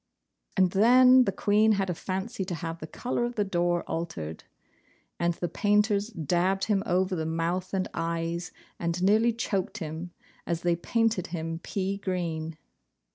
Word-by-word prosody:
And 185 -2 +4
then 250 +5 +7
the 195 - +1
Queen 210 +3 +3
had 195 -1 0
a 180 - -1
fancy 190 +4 -3
to 180 -2 -3
have 165 -1 -5
the 155 - -7
colour 240 +7 -2
of 240 0 -2
the 210 - +2
door 175 -2 0
altered; 80 - -5 0.7
and 170 0 +1
the 175 - -2
painters 205 +3 +2
dabbed 180 - 0
him 205 -3 +2
over 185 +1 +1
the 160 - -2
mouth 170 +3 -1
and 190 -1 -1
eyes, 170 +1 -2 0.3
and 170 +1 -1
nearly 220 +4 +4
choked 215 -2 -2
him, 160 -1 -5 0.4
as 170 -1 -1
they 175 -1 +3
painted 225 +2 0
him 165 -1 -4
pea 195 +2 -2
green. 165 -4 -3
185 Hz, 160 wpm, -28 LUFS, 170-205 Hz, 0.7 s, then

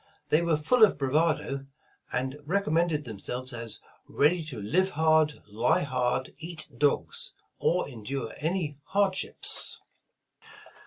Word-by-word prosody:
They 155 - +4
were 170 -2 +2
full 220 +11 +3
of 210 - +6
bravado 140 -1 0 0.4
and 130 +3 -2
recommended 165 -2 +1
themselves 125 +4 -5
as 115 -2 -6 0.3
ready 165 +4 +2
"to 145 -7 -6
live 175 - +1
hard, 155 -2 +2
lie 110 +7 +2
hard, 130 -2 -1
eat 165 -1 -6
dogs," 145 -1 0
— - - -47
or 180 +1 +1
endure 125 -1 -5
any 155 -3 -1
hardships. 195 -1 +2
150 Hz, 120 wpm, -28 LUFS, 130-170 Hz, 0.4 s, of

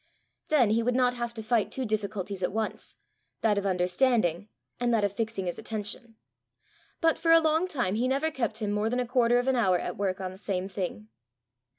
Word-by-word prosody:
then 255 -9 +4
he 225 +2 +3
would 245 +1 0
not 250 -1 +3
have 240 -1 -3
to 225 -2 -7
fight 220 -1 +1
two 265 - -2
difficulties 205 -3 -3
at 180 - 0
once 220 +1 -4 0.5
that 210 -2 +3
of 200 - -2
understanding, 185 0 +1 0.3
and 240 0 +1
that 225 -3 +2
of 200 -1 +1
fixing 220 -2 -3
his 175 - -3
attention. 220 +1 -6 0.9
But 325 -1 +3
for 330 - +2
a 330 - +8
long 320 +2 +2
time 245 - -1
he 235 +4 +1
never 280 +5 0
kept 230 -6 -2
him 210 -2 -2
more 210 +2 0
than 245 +2 0
a 250 - 0
quarter 240 -1 +3
of 245 +1 0
an 265 - +3
hour 190 -7 +3
at - - -5
work 195 -1 -1
on 185 -1 -4
the 190 - -12
same 190 -2 -2
thing. 180 - -5
220 Hz, 215 wpm, -28 LUFS, 195-245 Hz, 0.9 s, a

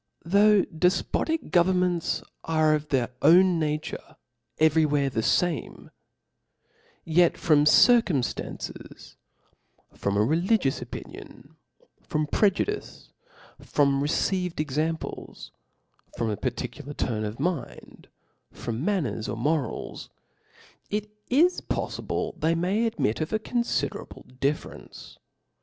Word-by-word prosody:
^xu/ 165 - -10
THOUGH 205 0 +5
dcfpotic 310 - 0
governments 180 -1 +2 0.2
are 155 -1 +2
of 150 0 -1
their 130 -4 +2
Chap.'a9. 160 +9 +5 0.2
0''^" 150 -1 0
naturc - - -9 0.4
every 160 0 +4
where 145 -2 +1
the 115 - -1
fame; 165 +3 -1 1.1
yet 170 +1 +3
from 150 -2 +3
circumftances, 190 - +1 0.8
from 100 0 -2
a 105 - +4
religious 165 - +1
opinion^ - - -10 0.5
from 155 0 -2
pre* 205 +7 +3
judice, 415 - -5 0.5
from 140 -1 +1
received 180 +4 -1
examples, 155 +2 -3 0.7
from 115 -2 -1
a - - -1
particular 140 +4 -5
turn 110 -3 -2
of 105 +1 -5
mind, 170 -8 -4 0.4
from 115 +3 -5
manners 150 - -1
or - - -4
morals, 145 +3 -2 0.8
it 210 0 -3 0.2
is 335 +8 +3
pofli - - -4
ble - - -2
they 165 +1 +2
may 195 +7 +1
admit 185 - -1
of 155 - -2
aconfiderable 220 - -2 0.2
difierence. 140 +2 -4
160 Hz, 110 wpm, -26 LUFS, 140-185 Hz, 1.1 s, THOUGH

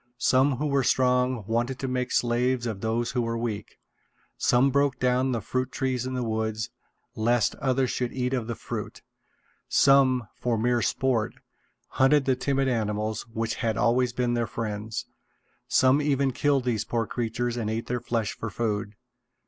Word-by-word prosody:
Some 130 +3 +3
who 145 +5 -2
were 140 -2 +2
strong 125 -2 +2
wanted 120 +4 -1
to 135 - -3
make 125 0 -2
slaves 120 +1 +1
of 110 -4 -4
those 115 +2 -1
who 125 -2 0
were 115 0 -2
weak. 110 -3 -4 0.6
Some 125 +3 +3
broke 140 0 +2
down 125 +1 +2
the 115 -3 -1
fruit 130 +3 -2
trees 130 -2 -1
in 130 - -3
the 125 - -1
woods, 110 -1 -2 0.4
lest 115 0 +2
others 130 -1 +1
should 125 -1 -2
eat 125 0 -2
of 120 -4 -1
the 115 - -3
fruit. - - -6 0.7
Some, 130 -4 +4
for 120 -2 -1
mere 120 +2 +1
sport, 120 -4 0 0.5
hunted 135 +1 +3
the 130 - +2
timid 135 +1 0
animals 110 -2 -1
which 115 0 -2
had 115 -3 0
always 120 +1 +2
been 125 0 0
their 120 -1 0
friends. 110 -1 -4 0.6
Some 130 +3 +4
even 140 -2 +1
killed 140 +1 +1
these 115 -4 0
poor 115 -1 -1
creatures 120 +1 -2
and 115 -3 -2
ate 110 +1 -2
their 125 -1 -2
flesh 115 -4 -2
for 115 - -5
food. 105 -1 -2
120 Hz, 170 wpm, -26 LUFS, 115-130 Hz, 0.7 s, Some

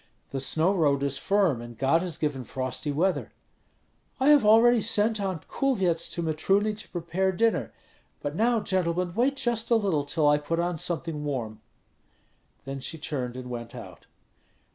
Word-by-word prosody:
The 135 - -3
snow 160 +7 +2
road 145 -6 +2
is 140 -1 0
firm, 190 - +1
and 120 -1 -10
God 140 +6 +2
has 180 -4 -4
given 145 -4 -2
frosty 130 +4 -3
weather." 180 +6 -1 0.9
"I 265 +2 +3
have 295 -4 +6
already 225 +2 +6
sent 215 0 +3
Aunt 185 -5 -4
Kulvyets 190 -12 0
to 170 - -3
Mitruny 195 +7 +1
to 215 +1 -9
prepare 180 +3 -1
dinner. 225 +5 0 0.5
But 145 +1 -4
now, 230 +3 +2
gentlemen, 180 -2 -1
wait 255 +7 +1
just 240 -4 -1
a 235 - +4
little 195 -10 +1
till 145 +1 0
I 145 0 +4
put 165 +3 -2
on 175 -1 -1
something 165 -3 -2
warm." 115 -7 -4 1.0
Then 135 0 -5
she 160 +5 -4
turned 130 -5 -4
and 130 -1 -7
went 120 0 -7
out. 95 -8 -11
170 Hz, 165 wpm, -26 LUFS, 140-205 Hz, 1.0 s, have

